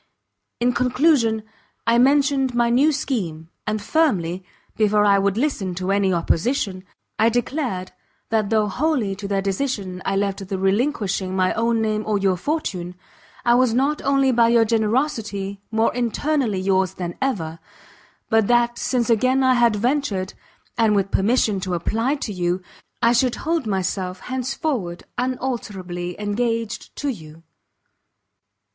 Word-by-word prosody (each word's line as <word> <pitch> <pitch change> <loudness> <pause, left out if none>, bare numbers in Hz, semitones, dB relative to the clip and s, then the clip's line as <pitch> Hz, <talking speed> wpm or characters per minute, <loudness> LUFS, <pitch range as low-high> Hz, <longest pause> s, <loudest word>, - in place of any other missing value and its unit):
In 245 +1 +2
conclusion 250 -3 +2 0.4
I 235 +1 +4
mentioned 270 -1 +3
my 235 -1 +2
new 275 +6 +4
scheme, 180 - -3 0.2
and 215 0 0
firmly, 195 - 0 0.3
before 210 -1 +3
I 200 -1 +5
would 200 +1 +1
listen 220 -9 -1
to 185 +2 -2
any 200 -1 +2
opposition, 185 - 0 0.4
I 225 +1 +5
declared 240 -6 -2 0.4
that 220 -2 +1
though 215 -2 +2
wholly 235 -3 0
to 200 +1 -6
their 195 -1 -1
decision 195 -3 -2
I 195 - -1
left 195 -1 -1
the 195 0 -3
relinquishing 195 -2 0
my 185 -1 +2
own 230 0 +1
name 215 -1 0
or 215 -1 +1
your 195 -2 +2
fortune, 180 - -3 0.5
I 240 - +5
was 245 -2 +3
not 280 +4 +1
only 275 -1 +3
by 235 -1 +4
your 230 -1 +4
generosity 215 -3 -1
more 225 +1 +1
internally 245 -2 0
yours 190 -1 +1
than 175 -1 -4
ever, 165 -12 -2 0.7
but 225 -2 +3
that 240 0 +2
since 245 -3 0
again 255 +3 +3
I 260 0 +5
had 235 -3 +3
ventured, 220 -5 -1 0.5
and 220 -2 +4
with 195 -1 0
permission 210 -1 +2
to 185 -1 -2
apply 225 - 0
to 210 - -4
you, 180 0 -1 0.4
I 230 +1 +5
should 245 0 +2
hold 325 -6 0
myself 185 -1 -2
hence 260 0 -3
forward 215 - -3 0.2
unalterably 205 -9 -3
engaged 225 +2 -2
to 290 - -2
you. 160 - -8
220 Hz, 145 wpm, -22 LUFS, 190-250 Hz, 0.7 s, I